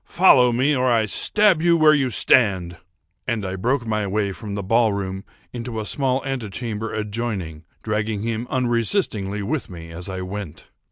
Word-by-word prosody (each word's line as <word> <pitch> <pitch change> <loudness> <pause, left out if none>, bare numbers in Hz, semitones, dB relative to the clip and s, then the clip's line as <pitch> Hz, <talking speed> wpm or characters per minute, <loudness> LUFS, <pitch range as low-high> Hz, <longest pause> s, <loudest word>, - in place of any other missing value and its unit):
Follow 130 -9 +5
me, 135 +5 +2
or 130 -1 +1
I 115 -2 +3
stab 195 - +2
you 170 0 +4
where 155 -1 +6
you 135 -4 +1
stand!"—and 90 -1 0
I 95 0 -4
broke 120 +6 -1
my 105 -2 -1
way 100 0 -1
from 100 +1 -7
the 100 - -4
ball 115 +3 +3
room 95 -1 -4 0.3
into 120 -2 -5
a 110 - -4
small 135 +2 0
ante 130 -6 -3
chamber 110 +1 -4
adjoining, 105 -7 -4 0.2
dragging 105 -1 -2
him 115 +1 -3
unresistingly 115 - 0
with 145 +7 -3
me 85 -2 -10
as 90 +3 -8
I 95 -1 -5
went. 90 -3 -7
110 Hz, 170 wpm, -22 LUFS, 95-125 Hz, 0.3 s, where